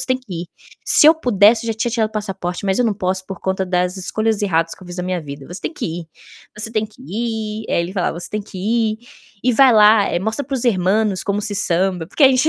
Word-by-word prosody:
"Você 255 - +1
que 255 -6 -12
ir. - - -9 0.4
Se - - +5
eu 320 - +7
pudesse, 230 -5 +3
eu 225 - 0
já - - -9
tinha 240 - 0
tirado 220 -2 0
o - - -25
passaporte, 195 -4 -4
mas 190 +2 +1
eu 250 - +3
não 220 -3 +1
posso, 190 -1 -2
por 190 -3 -7
conta 190 0 -1
das 180 +1 0
escolhas 215 +3 -1
erradas 165 -4 +1
que - - -18
eu - - -12
fiz 175 0 -8
na - - -1
minha 180 -1 -2
vida. 140 -2 -9
Você 175 - -7
tem - - -3
que 255 - -5 0.2
ir, - - -16 0.5
você 220 +1 -3
tem 215 -1 0
que 220 +4 -18
ir". 220 -2 -4
Aí - - +1
ele 170 +2 -4
falava: 175 -3 -2
"Você - - -6
tem 210 0 -3
que 200 -1 -12
ir, 220 +2 0 0.5
e 250 - +3
vai 260 +1 +6
lá, 210 -1 +6
mostra 220 +8 -1
para 275 - -4
os 260 - -1
hermanos 200 -2 +1
como 200 +1 -1
se 205 0 -2
samba", 180 -2 +1
porque 200 - -2
a - - +9
gente 260 +3 +3
210 Hz, 265 wpm, -19 LUFS, 185-225 Hz, 0.5 s, a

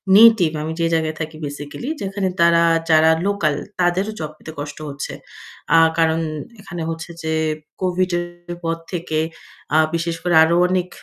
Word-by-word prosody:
native 215 -7 +7
আমি 160 +1 -3
যে 165 - +2
জায়গায় 160 -1 0
থাকি 155 0 -5
basically 145 - -6
যেখানে 195 0 -2
তারা 170 0 +5 0.3
যারা 160 0 +6 0.2
local 200 -8 +1 0.3
তাদেরও 180 +4 +1
job 155 -1 -4
পেতে 160 - -10
কষ্ট 145 0 -6
হচ্ছে। 140 0 -5 0.6
আ - - +8 0.2
কারণ 165 0 +3 0.4
এখানে 175 -3 -7
হচ্ছে 165 +1 -5
যে 160 0 -1 0.5
Covid-এর 175 -1 -2
পর 165 0 0 0.2
থেকে 165 -3 -2 0.6
আ - - +6 0.2
বিশেষ 170 0 -1
করে 175 -2 +2
আরও 165 +1 +2
অনেক 180 -1 0
170 Hz, 150 wpm, -20 LUFS, 160-180 Hz, 0.6 s, আ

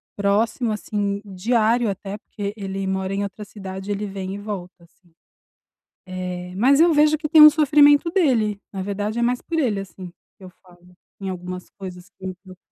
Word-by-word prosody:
próximo 220 +4 +1
assim, 205 -1 -2
diário, 220 +4 +1
até 195 +1 -5
porque 205 -2 -6
ele 195 -2 -4
mora 190 0 -2
em 200 +1 -1
outra 200 +1 -6
cidade, 195 -1 -7
ele 205 +1 -2
vem 195 -1 -5
e - - -5
volta, 195 -4 -7
assim, 170 +1 -26 0.9
eh, 180 -1 -6
mas 265 +8 +4
eu 335 0 +5
vejo 300 +1 +4
que 305 0 -4
tem 315 -1 +7
um 305 - +12
sofrimento 295 +1 +5
dele, 230 - +1
na 190 - -4
verdade, 205 +3 -3
é - - 0
mais 245 +1 0
por 335 - -4
ele, 230 -9 0
assim, 185 -1 -10 0.3
que - - -17
eu 185 - -10
falo, 180 -1 -21 0.3
em 195 -1 -4
algumas 180 0 -6
coisas 180 -2 -9
que 190 - -9
me 185 - -5
preocupam. 185 -2 -13
200 Hz, 190 wpm, -22 LUFS, 190-235 Hz, 0.9 s, um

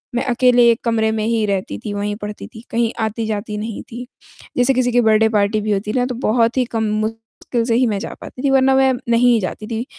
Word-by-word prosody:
मैं 245 - 0
अकेले 245 -1 +4
1 230 - -2
कमरे 220 -1 +1
में 220 -1 -2
ही 225 -1 +1
रहती 190 - -2
थी, 205 - -3
वहीं 205 0 -2
पढ़ती 210 0 -7
थी, 225 0 -13
कहीं 230 0 0
आती-जाती 220 -1 -3
नहीं 215 +1 -5
थी। 245 +2 -7 0.5
जैसे 250 +2 +3
किसी 245 -1 +1
की 245 - +3
बर्थडे 220 -1 +4
पार्टी 210 0 +1
भी 215 0 -2
होती 205 +1 -1
है 255 - -2
ना 250 - +2
तो 250 - -4
बहुत 230 0 +1
ही 255 - +2
कम 225 -2 -2
मुश्किल 225 +2 -3
से 230 -1 +1
ही 255 +2 +3
मैं 210 -3 -1
जा - - -6
पाती 250 - -9
थी 275 - +2
वरना 265 0 +4
मैं 265 0 +4 0.2
नहीं 235 +1 +4
ही 230 - +3
जाती 210 +2 -5
थी। 230 +2 -3
225 Hz, 245 wpm, -19 LUFS, 215-245 Hz, 0.5 s, अकेले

